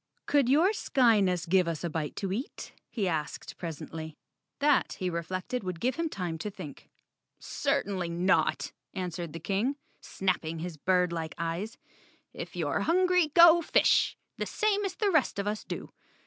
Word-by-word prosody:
"Could 280 Hz, -4 st, +3 dB
your 320 Hz, +9 st, +5 dB
Skyness 215 Hz, -, +3 dB
give 180 Hz, 0 st, +3 dB
us 165 Hz, -1 st, -3 dB
a 170 Hz, -, -1 dB
bite 155 Hz, -2 st, -3 dB
to 195 Hz, -2 st, -3 dB
eat?" 245 Hz, +7 st, -6 dB, 0.2 s
he 205 Hz, -5 st, -1 dB
asked 155 Hz, -4 st, -3 dB
presently. 160 Hz, -1 st, -6 dB, 0.4 s
That, 290 Hz, -1 st, +3 dB
he 185 Hz, -2 st, -3 dB
reflected, 185 Hz, +8 st, -3 dB
would 180 Hz, -3 st, -4 dB
give 255 Hz, +7 st, +1 dB
him 330 Hz, -1 st, -1 dB
time 175 Hz, -, -4 dB
to 210 Hz, -, -3 dB
think. 185 Hz, -8 st, -10 dB, 0.5 s
"Certainly 185 Hz, -3 st, -1 dB
not," 175 Hz, +3 st, +1 dB, 0.2 s
answered 175 Hz, -3 st, -4 dB
the 165 Hz, -, -7 dB
King, 200 Hz, -, 0 dB, 0.3 s
snapping 170 Hz, -4 st, -1 dB
his 170 Hz, +1 st, -5 dB
birdlike 170 Hz, -1 st, 0 dB
eyes. 170 Hz, +6 st, -3 dB, 0.6 s
"If -, -, -7 dB
you're -, -, 0 dB
hungry, 360 Hz, 0 st, +3 dB
go 340 Hz, 0 st, +9 dB
fish, -, -, +3 dB, 0.2 s
the -, -, -2 dB
same 415 Hz, -1 st, +1 dB
as 375 Hz, -2 st, -3 dB
the 415 Hz, -2 st, +1 dB
rest 310 Hz, -, +2 dB
of 200 Hz, -, -1 dB
us 210 Hz, +1 st, -2 dB
do. -, -, -6 dB
190 Hz, 160 wpm, -29 LUFS, 170-265 Hz, 0.6 s, go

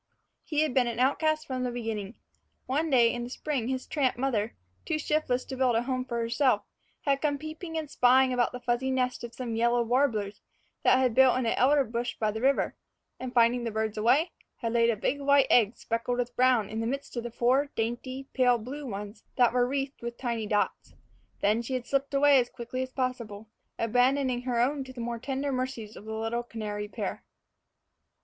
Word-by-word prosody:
He 300 Hz, -2 st, 0 dB
had 310 Hz, -4 st, +1 dB
been 250 Hz, -2 st, +3 dB
an 235 Hz, -1 st, -3 dB
outcast 310 Hz, +4 st, +2 dB
from 260 Hz, -3 st, -3 dB
the 250 Hz, -, 0 dB
beginning. 225 Hz, -3 st, -4 dB, 0.5 s
One 300 Hz, +5 st, 0 dB
day 240 Hz, -4 st, +4 dB
in 240 Hz, -, -3 dB
the 240 Hz, -, -6 dB
spring 265 Hz, -3 st, -3 dB
his 260 Hz, 0 st, -2 dB
tramp 270 Hz, -6 st, 0 dB
mother, 235 Hz, -4 st, -1 dB, 0.3 s
too 320 Hz, -, -1 dB
shiftless 300 Hz, -4 st, 0 dB
to 265 Hz, -, -6 dB
build 255 Hz, -2 st, +2 dB
a 230 Hz, -, +2 dB
home 255 Hz, 0 st, -2 dB
for 235 Hz, -2 st, -3 dB
herself, 230 Hz, -1 st, +2 dB, 0.4 s
had 275 Hz, -1 st, +1 dB
come 290 Hz, -2 st, +1 dB
peeping 315 Hz, +3 st, -6 dB
and 315 Hz, -1 st, -3 dB
spying 255 Hz, 0 st, +4 dB
about 245 Hz, -1 st, +1 dB
the 250 Hz, -, -6 dB
fuzzy 245 Hz, +2 st, -1 dB
nest 255 Hz, -2 st, -1 dB
of 235 Hz, 0 st, -7 dB
some 240 Hz, -3 st, -4 dB
yellow 235 Hz, +1 st, +2 dB
warblers 225 Hz, -5 st, 0 dB, 0.4 s
that -, -, +5 dB
had 255 Hz, -3 st, +2 dB
built 260 Hz, +1 st, +5 dB
in 255 Hz, -, -1 dB
an 225 Hz, -, +2 dB
elder 280 Hz, +3 st, +4 dB
bush 240 Hz, 0 st, -3 dB
by 215 Hz, -1 st, 0 dB
the 220 Hz, +1 st, -5 dB
river; 275 Hz, +2 st, +2 dB, 0.4 s
and 255 Hz, -1 st, -5 dB
finding 240 Hz, +1 st, +4 dB
the 235 Hz, -, -1 dB
birds 220 Hz, -1 st, -2 dB
away, 265 Hz, +10 st, +3 dB, 0.2 s
had 230 Hz, -2 st, -3 dB
laid 235 Hz, 0 st, +4 dB
a 230 Hz, -, +2 dB
big 280 Hz, +7 st, -1 dB
white 280 Hz, -1 st, +5 dB
egg 225 Hz, -2 st, +4 dB
speckled 230 Hz, +2 st, -2 dB
with 245 Hz, -1 st, -2 dB
brown 250 Hz, -5 st, +3 dB
in 220 Hz, +2 st, -4 dB
the 225 Hz, -, -1 dB
midst 275 Hz, +2 st, -4 dB
of 235 Hz, -1 st, -5 dB
four 265 Hz, +4 st, +2 dB
dainty 250 Hz, +4 st, -3 dB
pale 250 Hz, -2 st, +4 dB
blue 270 Hz, +6 st, -7 dB
ones 205 Hz, 0 st, -7 dB
that 245 Hz, -2 st, +4 dB
were 245 Hz, -1 st, +3 dB
wreathed 275 Hz, +1 st, -3 dB
with 235 Hz, 0 st, -5 dB
tiny 235 Hz, -4 st, -2 dB
dots. 205 Hz, 0 st, -1 dB, 0.5 s
Then 215 Hz, +3 st, +2 dB
she 255 Hz, +2 st, -3 dB
had 250 Hz, -1 st, -3 dB
slipped 275 Hz, 0 st, -1 dB
away 280 Hz, -1 st, +6 dB
as 245 Hz, -1 st, 0 dB
quickly 250 Hz, +1 st, -5 dB
as 260 Hz, 0 st, -4 dB
possible, 235 Hz, -5 st, -4 dB, 0.3 s
abandoning 250 Hz, +2 st, +2 dB
her 245 Hz, -2 st, -1 dB
own 270 Hz, +3 st, +1 dB
to 260 Hz, -, -10 dB
the 250 Hz, -, -10 dB
more 235 Hz, 0 st, -3 dB
tender 270 Hz, +2 st, -2 dB
mercies 255 Hz, -4 st, -4 dB
of 205 Hz, -, -11 dB
the 220 Hz, 0 st, -5 dB
little 225 Hz, +2 st, -2 dB
canary 210 Hz, -3 st, -5 dB
pair. -, -, -5 dB
245 Hz, 210 wpm, -28 LUFS, 230-265 Hz, 0.5 s, away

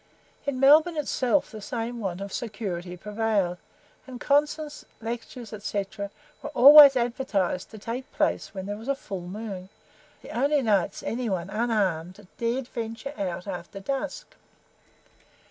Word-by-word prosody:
In 270 Hz, -2 st, -1 dB
Melbourne 310 Hz, +5 st, +6 dB
itself 275 Hz, -2 st, +1 dB
the 215 Hz, -2 st, -8 dB
same 235 Hz, +2 st, -4 dB
want 190 Hz, -3 st, -3 dB
of 200 Hz, -1 st, -6 dB
security 190 Hz, -6 st, -4 dB
prevailed, 205 Hz, -3 st, -1 dB, 0.5 s
and 255 Hz, -2 st, -8 dB
concerts, 295 Hz, +2 st, 0 dB, 0.2 s
lectures, 235 Hz, 0 st, -6 dB
&c., 200 Hz, -2 st, -1 dB, 0.6 s
were -, -, -5 dB
always 285 Hz, +1 st, +10 dB
advertised 235 Hz, -7 st, -1 dB
to 220 Hz, -, -11 dB
take 235 Hz, +5 st, -6 dB
place -, -, 0 dB
when 190 Hz, -2 st, -6 dB
there 205 Hz, +1 st, -4 dB
was 225 Hz, -, -10 dB
a 275 Hz, -, +1 dB
full 190 Hz, -9 st, -7 dB
moon, 195 Hz, -1 st, -6 dB, 0.5 s
the -, -, -9 dB
only 280 Hz, +3 st, +2 dB
nights 200 Hz, -4 st, +1 dB
any 240 Hz, 0 st, -2 dB
one, 185 Hz, -1 st, -2 dB
unarmed, 200 Hz, -4 st, -1 dB
dared 240 Hz, +2 st, -1 dB
venture, 230 Hz, +4 st, -5 dB
out 180 Hz, -4 st, -3 dB
after 195 Hz, 0 st, -6 dB
dusk. 275 Hz, +7 st, -4 dB
225 Hz, 140 wpm, -26 LUFS, 195-260 Hz, 0.6 s, always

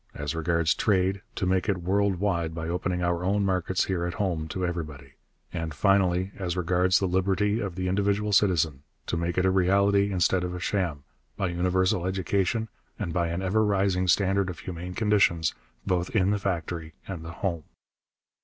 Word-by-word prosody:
As 75 Hz, +1 st, -3 dB
regards 85 Hz, 0 st, +1 dB
trade, 95 Hz, -1 st, +1 dB
to 95 Hz, -, -1 dB
make 95 Hz, +2 st, +1 dB
it 90 Hz, -3 st, 0 dB
world 100 Hz, +2 st, +2 dB
wide 85 Hz, -4 st, -1 dB
by 80 Hz, 0 st, -4 dB
opening 90 Hz, +1 st, -1 dB
our 85 Hz, 0 st, 0 dB
own 100 Hz, +2 st, +1 dB
markets 95 Hz, -1 st, 0 dB
here 90 Hz, -3 st, -1 dB
at 90 Hz, -, -5 dB
home 85 Hz, -6 st, -1 dB
to 90 Hz, +4 st, -2 dB
everybody. 75 Hz, -6 st, -5 dB, 0.4 s
And, 80 Hz, -3 st, -4 dB
finally, 95 Hz, +1 st, +2 dB
as 95 Hz, -2 st, -3 dB
regards 90 Hz, +1 st, +3 dB
the 95 Hz, -, 0 dB
liberty 95 Hz, +4 st, +1 dB
of 100 Hz, -6 st, -4 dB
the 90 Hz, 0 st, -2 dB
individual 100 Hz, +2 st, +1 dB
citizen, 80 Hz, -8 st, +2 dB, 0.2 s
to -, -, -2 dB
make 85 Hz, +1 st, -2 dB
it 90 Hz, -, +3 dB
a 95 Hz, -, +4 dB
reality 100 Hz, +2 st, +3 dB
instead 90 Hz, 0 st, +2 dB
of 90 Hz, 0 st, -3 dB
a -, -, -5 dB
sham, 85 Hz, -6 st, -1 dB, 0.3 s
by 95 Hz, -, 0 dB
universal 90 Hz, +2 st, +1 dB
education 95 Hz, +4 st, 0 dB, 0.3 s
and 95 Hz, -6 st, -3 dB
by 85 Hz, 0 st, +1 dB
an 85 Hz, +3 st, -3 dB
ever 105 Hz, +4 st, +2 dB
rising 95 Hz, -3 st, +1 dB
standard 95 Hz, +1 st, +2 dB
of 80 Hz, -4 st, -7 dB
humane 90 Hz, +1 st, -6 dB
conditions 100 Hz, -7 st, +2 dB, 0.3 s
both 90 Hz, -1 st, 0 dB
in 100 Hz, -2 st, +3 dB
the 105 Hz, -, 0 dB
factory 85 Hz, -4 st, -3 dB
and 90 Hz, -4 st, -6 dB
the 85 Hz, +1 st, -7 dB
home. 85 Hz, -4 st, -3 dB
90 Hz, 180 wpm, -27 LUFS, 85-100 Hz, 0.4 s, a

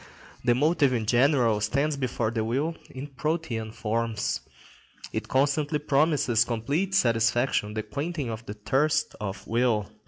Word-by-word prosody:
The 120 Hz, -1 st, +3 dB
motive 145 Hz, 0 st, +3 dB
in 115 Hz, -3 st, -1 dB
general 120 Hz, -2 st, +3 dB
stands 140 Hz, +8 st, +1 dB
before 125 Hz, -4 st, -1 dB
the 115 Hz, -2 st, -1 dB
will 140 Hz, +9 st, -1 dB
in 130 Hz, +2 st, -7 dB
protean 140 Hz, -6 st, -3 dB
forms. 115 Hz, 0 st, -1 dB, 0.7 s
It -, -, -3 dB
constantly 145 Hz, +3 st, +1 dB
promises 145 Hz, -5 st, +2 dB
complete 140 Hz, -, -1 dB
satisfaction, 115 Hz, -, +2 dB
the 110 Hz, -, -2 dB
quenching 140 Hz, +4 st, -3 dB
of 110 Hz, +1 st, -6 dB
the 105 Hz, -, -5 dB
thirst 150 Hz, +8 st, +1 dB
of 100 Hz, -1 st, -5 dB
will. 115 Hz, -3 st, +1 dB
125 Hz, 135 wpm, -27 LUFS, 110-145 Hz, 0.7 s, The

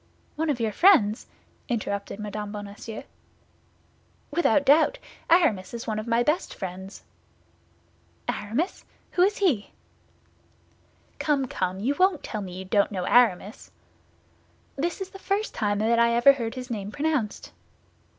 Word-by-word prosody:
"One 320 Hz, +1 st, -1 dB
of 275 Hz, -4 st, 0 dB
your 225 Hz, -2 st, 0 dB
friends?" 220 Hz, -, +4 dB, 0.4 s
interrupted 200 Hz, -3 st, -3 dB
Mme. 210 Hz, 0 st, -5 dB
Bonacieux. 205 Hz, +1 st, -7 dB, 1.3 s
"Without 290 Hz, -3 st, +2 dB
doubt; 315 Hz, -, +5 dB, 0.3 s
Aramis 245 Hz, -, +3 dB
is 235 Hz, -, -6 dB
one 215 Hz, -2 st, -2 dB
of 215 Hz, -, -6 dB
my 235 Hz, +1 st, +2 dB
best 300 Hz, +7 st, -1 dB
friends." 190 Hz, +1 st, -7 dB, 1.2 s
"Aramis! 245 Hz, -, -2 dB, 0.3 s
Who 355 Hz, -, +1 dB
is 400 Hz, +3 st, +3 dB
he?" 295 Hz, -, +1 dB, 1.5 s
"Come, 285 Hz, -3 st, +1 dB
come, 185 Hz, -6 st, -3 dB
you 250 Hz, +8 st, 0 dB
won't 370 Hz, -4 st, +3 dB
tell 215 Hz, -, -4 dB
me 185 Hz, -2 st, -7 dB
you 190 Hz, -, -6 dB
don't 200 Hz, +2 st, +2 dB
know 185 Hz, -3 st, -3 dB
Aramis?" 220 Hz, -4 st, +2 dB, 1.1 s
"This 345 Hz, +7 st, -2 dB
is 385 Hz, -, -4 dB
the 390 Hz, -, -11 dB
first 400 Hz, +3 st, -1 dB
time 205 Hz, -1 st, 0 dB
I 235 Hz, +1 st, +3 dB
ever 240 Hz, +4 st, +7 dB
heard 235 Hz, -3 st, -4 dB
his 250 Hz, -1 st, -7 dB
name 205 Hz, -2 st, -4 dB
pronounced." 285 Hz, -6 st, -2 dB
235 Hz, 135 wpm, -26 LUFS, 205-300 Hz, 1.5 s, ever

